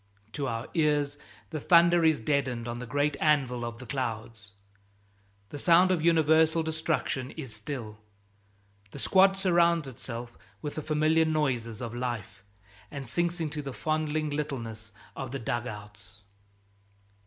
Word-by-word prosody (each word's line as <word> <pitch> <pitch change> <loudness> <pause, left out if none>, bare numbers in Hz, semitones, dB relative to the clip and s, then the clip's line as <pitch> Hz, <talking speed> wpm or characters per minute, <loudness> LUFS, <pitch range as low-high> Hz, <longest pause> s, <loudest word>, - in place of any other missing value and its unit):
To 140 +3 -3
our 115 -1 -3
ears 145 -3 +1 0.3
the 155 - -3
thunder 170 +2 +5
is 160 -2 +4
deadened 125 -2 -1
on 120 0 -4
the 125 - -6
great 145 +3 +1
anvil 135 -6 +2
of 120 0 -5
the 125 - -10
clouds. 110 -5 -4 1.0
The 145 - -7
sound 180 +4 +5
of 170 -4 +1
universal 160 0 +4
destruction 160 -5 -1
is 135 -8 -6
still. 110 -1 -6 0.9
The - - -10
squad 195 0 +4
surrounds 170 -4 +3
itself 120 -1 -7 0.2
with 145 - -5
the 155 - -4
familiar 155 +2 +2
noises 130 -7 -1
of 115 -1 -5
life, 120 -6 -4 0.5
and 140 -3 -7
sinks 175 +8 -1
into 150 -2 -3
the 140 -2 -6
fondling 155 0 -1
littleness 115 -8 -4 0.2
of 135 -3 -5
the 135 - -3
dug 120 -1 -2
outs. 105 -1 -10
145 Hz, 140 wpm, -28 LUFS, 120-160 Hz, 1.0 s, thunder